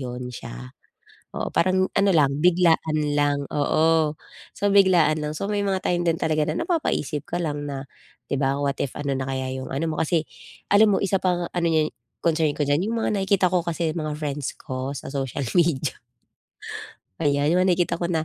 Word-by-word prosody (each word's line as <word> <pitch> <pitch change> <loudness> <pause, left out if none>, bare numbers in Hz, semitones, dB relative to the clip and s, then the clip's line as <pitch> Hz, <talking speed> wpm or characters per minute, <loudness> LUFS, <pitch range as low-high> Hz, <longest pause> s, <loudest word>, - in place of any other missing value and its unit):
yun 125 -1 -5
siya. 65 - -9 0.7
Oo, - - -2
parang 185 +2 +3
ano 200 0 +3
lang, 145 -4 +4
biglaan 165 -3 +3 0.2
lang, 145 -1 +1
oo. 155 +1 +2 0.4
So, 205 0 +1
biglaan 175 -6 +4
lang. 150 0 -2
So, 200 - -2
may 205 -1 0
mga 190 -1 0
time 175 0 +1
din 165 -1 +2
talaga 155 -1 +1
na 155 - -2
napapaisip 150 - -1
ka 175 - -1
lang 145 -2 -2
na, 135 -1 -5 0.4
di - - -2
ba 135 0 +1
what 140 -1 0
if 135 - -2
ano 140 -2 -1
na 135 - -2
kaya 130 -1 -3
yung 130 0 -6
ano 140 +5 -1
mo, - - -4
kasi 160 0 +1 0.5
alam 210 +1 +7
mo - - +2
isa 195 0 +1
pang 175 -2 +1
ano 175 -1 -1
'yan, 155 -1 +2 0.3
concern 160 -3 +2
ko - - 0
diyan, 145 +7 +1
yung 230 - -1
mga - - +1
nakikita 195 -2 +2
ko 180 -1 +2
kasi 170 -1 -1
mga 155 -1 -3
friends 145 -2 -3
ko 130 +2 -4
sa 135 - -7
social 135 0 -3 0.2
media. 155 -5 +1 1.2
Ayan, 145 +1 +2
yung 180 - +3
mga 185 -1 +4
nakikita 175 -1 0
ko 170 - 0
na, 160 -3 0
155 Hz, 195 wpm, -24 LUFS, 140-175 Hz, 1.2 s, alam